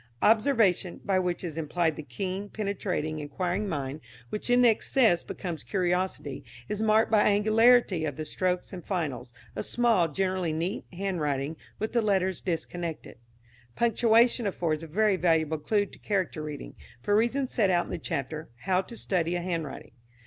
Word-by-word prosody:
Observation, 215 -6 +3
by 190 -2 +2
which 180 -1 -2
is 165 -2 -4
implied 160 +1 0
the - - -6
keen, 185 +9 -4
penetrating, 185 -7 -2
inquiring 180 +7 -2
mind 145 -2 -3 0.3
(which 210 - -4
in 245 0 +5
excess 225 -4 +3
becomes 175 -4 -5
curiosity), 180 -6 -1 0.2
is 210 0 -3
marked 220 +1 +3
by 215 -2 +5
angularity 215 -2 +4
of 145 -3 -2
the 155 - -5
strokes 180 +4 -2
and 180 -2 -7
finals; 145 - -3 0.2
a - - -2
small, 230 -8 +2
generally 185 +1 -1
neat, 170 +7 -2
handwriting, 160 -6 -2 0.2
with 220 +2 -3
the 235 - +3
letters 190 -3 +1
disconnected. 170 -5 -4 0.6
Punctuation 235 0 +3
affords 165 -5 -1
a 165 - -7
very 205 +4 +2
valuable 160 -3 +2
clue 205 +7 +1
to - - -15
character 190 -6 -1
reading, 150 -2 -7 0.3
for 205 - +2
reasons 250 +5 +1
set 205 -5 +3
out 175 -1 +2
in - - -9
the - - -3
chapter 155 0 -4
"How 185 -1 +2
to 230 +4 -11
Study 175 -4 0
a 175 - -1
Handwriting." 170 -5 -4
185 Hz, 160 wpm, -28 LUFS, 160-210 Hz, 0.6 s, in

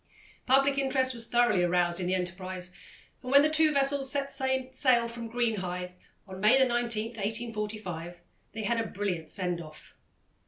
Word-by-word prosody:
Public 275 +2 +3
interest 265 -1 +1
was 230 -1 -3
thoroughly 240 -6 +3
aroused 175 0 +1
in 180 - -2
the 185 - +1
enterprise, 180 0 -4 0.5
and 255 - -6
when 280 +1 +7
the 305 - +2
two 315 0 +5
vessels 275 -1 +2
set 280 -1 0
sail 260 -2 +1
from 230 0 -7
Greenhithe 185 -7 -2 0.3
on 190 0 -9
May 215 +6 +5
19, 265 -1 +3 0.4
1845, 210 -6 -5 0.3
they 220 +1 -5
had 230 +3 0
a 225 - -2
brilliant 180 -6 -4
send 180 -3 -2
off. 155 -1 -13
225 Hz, 155 wpm, -29 LUFS, 180-260 Hz, 0.5 s, when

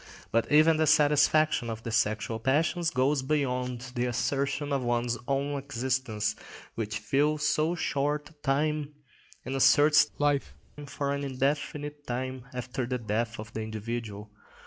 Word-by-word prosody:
But 115 0 +1
even 155 +2 +6
the 155 0 +2
satisfaction 150 -3 +4
of 115 0 -5
the 115 - -4
sexual 110 0 0
passions 160 +7 +1
goes 135 +1 +1
beyond 125 -3 -2
the 125 0 0
assertion 140 +4 -1
of 135 - +1
one's 120 0 0
own 140 +1 -1
existence, 125 -5 -2 0.4
which 110 -1 -3
fills 145 +7 +1
so 155 +3 +1
short 150 -1 -1
a - - -20
time, 150 +1 0 0.5
and 130 - -4
asserts 150 +3 +5
life 145 -1 0 0.3
for 140 0 -2
an 140 0 -3
indefinite 145 +2 -2
time 130 +1 -4
after 125 0 -4
the 125 0 -1
death 115 +1 -2
of 110 +1 -8
the 110 - -3
individual. 110 -1 -5
135 Hz, 145 wpm, -28 LUFS, 120-145 Hz, 0.5 s, even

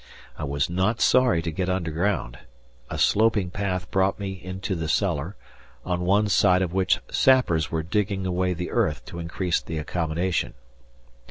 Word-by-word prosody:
I 75 - -5
was 70 0 0
not 95 +6 0
sorry 125 -10 +3
to 80 - -2
get 90 +3 -2
underground. 85 -6 -1 0.5
A - - -4
sloping 105 -4 +2
path 90 -2 -3
brought 95 +2 +1
me 100 -1 -3
into 95 +2 -4
the 80 -3 -3
cellar, 90 -1 0 0.5
on 90 -1 -1
one 100 +4 +2
side 95 -2 +4
of 90 -2 -3
which 95 -1 +2
sappers 125 -13 +3
were 80 -1 -2
digging 95 +2 -1
away 90 0 0
the 90 +1 -5
earth - - 0
to 85 - -8
increase 85 +1 -1
the 80 - -6
accommodation. 85 +3 -2
90 Hz, 160 wpm, -25 LUFS, 85-100 Hz, 0.5 s, side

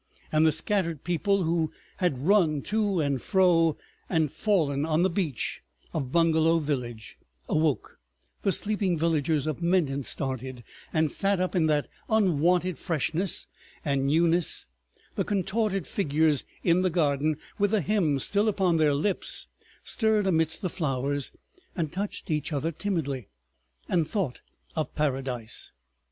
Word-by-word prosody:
And 155 +1 +4
the - - +5
scattered 165 -1 0
people 190 +3 +1
who 165 -1 0 0.3
had 175 -8 +1
run 165 -7 +3
to 210 -3 0
and 140 -4 0
fro, 175 -5 +3 0.3
and 160 -5 +1
fallen 155 -10 +1
on 160 +2 +2
the 190 - +2
beach 165 - -2 0.3
of 135 -5 -3
Bungalow 165 0 +4
village, 125 -8 -4 0.3
awoke; 155 -3 0 0.4
the 195 - +2
sleeping 200 -4 0
villagers 155 -2 +1
of 155 +1 -3
Menton 170 -6 +1
started, 130 -2 -3 0.3
and 155 -1 +1
sat 200 -1 +1
up 185 +1 -1
in 165 -3 +3
that 150 -2 +1 0.2
unwonted 180 -3 +2
freshness 165 +2 -1 0.4
and 140 -2 +1
newness; 165 +3 +3 0.5
the - - 0
contorted 195 -1 0
figures 155 -5 +1 0.2
in 175 +1 +4
the 185 - +2
garden, 155 -3 +1 0.2
with 205 0 +3
the 215 -1 +2
hymn 175 -7 +1
still 200 - +1
upon 190 -5 +2
their 150 -2 +3
lips, 185 +7 -1 0.3
stirred 220 -3 +2
amidst 160 -2 +1
the 185 - 0
flowers, 140 -4 -2 0.4
and 160 -5 -2
touched 200 -1 -4
each 150 0 -1
other 150 +3 -1
timidly, 155 - -3 0.6
and 165 -4 +1
thought 185 - -2 0.3
of 155 -4 -3
Paradise. 130 -6 -2
165 Hz, 140 wpm, -27 LUFS, 145-185 Hz, 0.6 s, the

